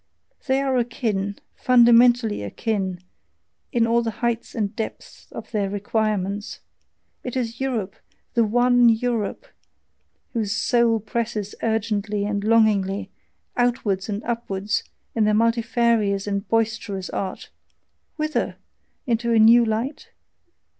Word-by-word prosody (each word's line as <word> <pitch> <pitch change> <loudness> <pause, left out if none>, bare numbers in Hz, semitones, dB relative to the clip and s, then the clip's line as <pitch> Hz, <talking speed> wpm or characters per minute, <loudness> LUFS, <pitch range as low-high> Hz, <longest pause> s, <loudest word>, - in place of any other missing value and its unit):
They 265 0 +2
are 265 -2 +1
akin, 215 -5 -1 0.2
fundamentally 240 - +5
akin, 185 - -3 0.7
in 235 -3 +2
all 235 +1 +2
the 230 - -2 0.2
heights 235 -1 -2
and 210 -2 -2
depths 220 - -7
of - - -9
their 205 -3 0
requirements; 205 -1 -2 0.6
it 250 - -5
is 235 -1 -3
Europe, 230 -8 -2 0.4
the 235 - +3
ONE 245 +2 +4
Europe, 230 - -1 0.9
whose 215 -4 -1
soul 230 0 +2
presses 215 -1 -3
urgently 210 -2 -1
and 205 -1 -2
longingly, 210 -3 +2 0.4
outwards 225 -6 0
and 205 +1 -3
upwards, 210 -4 -2 0.3
in 220 -2 +2
their 210 0 +3
multifarious 230 -3 +1
and 200 -1 -3
boisterous 220 -4 -1
art 190 -1 -5 0.6
whither? 310 0 -1 0.5
into 235 -2 0
a 230 - +4
new 230 +2 +7
light? 230 +6 -2
225 Hz, 115 wpm, -23 LUFS, 205-235 Hz, 0.9 s, new